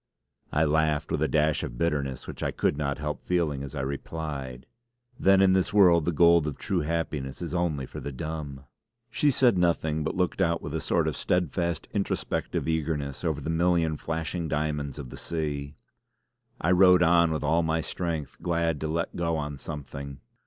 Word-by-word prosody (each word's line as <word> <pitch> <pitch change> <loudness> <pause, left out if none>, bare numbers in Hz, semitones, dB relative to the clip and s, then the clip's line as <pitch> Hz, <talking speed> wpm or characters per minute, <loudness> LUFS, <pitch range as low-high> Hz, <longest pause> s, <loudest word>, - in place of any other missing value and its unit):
I 80 +2 +2
laughed 75 0 +1
with - - 0
a - - +3
dash 75 -1 +2
of - - -5
bitterness 70 -4 -1
which - - -8
I - - 0
could - - 0
not 70 -1 -2
help 75 -2 -4
feeling 80 -6 0
as 70 +1 -7
I 70 - -2
replied: 70 -2 -5 0.5
"Then 95 0 +5
in 95 -1 +5
this 95 +2 +2
world 90 -6 +6
the 85 - +1
gold 85 -1 +5
of 75 - -4
true - - -1
happiness 75 -4 -2
is 85 -1 -5
only 85 -6 0
for - - -8
the 70 - -5
dumb!" 70 -1 -6 0.5
she 145 +7 +2
said 125 -7 +3
nothing 80 -3 +1
but 80 - -2
looked 90 +1 0
out 85 -2 +2
with 75 - -7
a 80 - -1
sort - - +1
of - - -1
steadfast 85 -2 -1
introspective 100 -5 -2
eagerness 75 -3 -2
over 80 -4 -1
the 80 - -2
million 85 -1 +2
flashing 80 +2 -3
diamonds 75 -2 -2
of 65 -5 -7
the - - -8
sea; 75 -3 -3 0.8
I 85 - +1
rowed 90 -1 +6
on 85 0 +5
with 80 - -2
all 80 +1 +3
my 80 0 0
strength, 80 -3 -4
glad 85 -3 0
to 80 - -1
let 80 +2 -2
go 85 -1 0
on 75 -2 -4
something. 70 -2 -7
80 Hz, 190 wpm, -27 LUFS, 75-85 Hz, 0.8 s, world